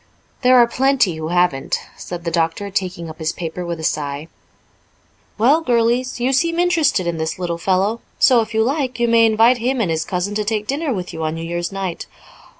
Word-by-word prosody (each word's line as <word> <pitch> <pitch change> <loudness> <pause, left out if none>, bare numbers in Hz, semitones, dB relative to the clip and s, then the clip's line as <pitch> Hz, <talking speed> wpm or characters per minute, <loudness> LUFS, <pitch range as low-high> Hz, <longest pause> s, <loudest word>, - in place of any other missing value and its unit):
"There 255 0 +5
are 240 - +7
plenty 255 -5 +2
who 160 0 -4
haven't," 175 -5 +1 0.2
said 175 -1 -7
the 170 - -2
doctor, 165 +4 -1
taking 185 -3 -3
up 160 0 -10
his 160 0 -1
paper 175 +1 -5
with 170 -1 -4
a - - -7
sigh. 150 0 -2 1.1
"Well, 270 +9 +4
girlies, 245 -1 +1
you 255 +3 +1
seem 335 +5 +1
interested 335 - +2
in 170 -1 -2
this 160 0 -2
little 170 -2 -3
fellow 195 +6 0 0.2
so, 250 -4 +5
if 220 - -5
you 220 0 +2
like, 260 -1 -1
you 240 - +2
may 230 -1 +5
invite 225 +3 +4
him 255 +3 0
and 195 -7 0
his 160 0 -1
cousin 180 +4 -3
to 210 0 -1
take 210 0 -2
dinner 285 +4 -2
with 185 -6 -4
you 160 - -5
on 155 0 -2
New 165 - -5
Year's 175 +1 -3
night." 190 -3 -4
200 Hz, 210 wpm, -19 LUFS, 170-245 Hz, 1.1 s, are